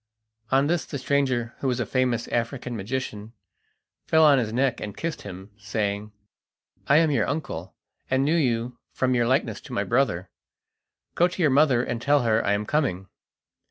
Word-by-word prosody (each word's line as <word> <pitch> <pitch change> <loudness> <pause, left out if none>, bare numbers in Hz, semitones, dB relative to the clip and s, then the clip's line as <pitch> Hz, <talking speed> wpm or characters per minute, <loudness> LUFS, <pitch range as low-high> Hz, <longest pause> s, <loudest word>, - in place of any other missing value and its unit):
On 135 +1 +3
this 170 +2 +1
the 140 - -5
stranger, 130 -3 0
who 135 - -2
was 125 -1 0
a 120 - 0
famous 125 0 0
African 120 +1 -2
magician, 110 0 -5 0.7
fell 160 0 +5
on 145 -3 +6
his 110 -3 -2
neck 125 +1 0
and 105 -1 -6
kissed 165 -1 -4
him, 95 +1 -9
saying: 105 0 -3 0.8
"I 145 - +5
am 160 -1 +4
your 115 -7 +1
uncle, 130 - -4 0.3
and 130 +1 +2
knew 155 +3 +2
you 125 -5 0
from 130 -1 +1
your 120 -1 +2
likeness 125 -4 0
to - - -10
my 100 - 0
brother. 100 -5 0 0.8
Go 175 - +4
to 180 - -9
your 155 -6 +3
mother 135 -3 +4
and 120 -2 -3
tell 145 0 +3
her 110 -1 +2
I 100 - +2
am 105 +1 -1
coming." 100 - -1
125 Hz, 180 wpm, -25 LUFS, 110-140 Hz, 0.8 s, on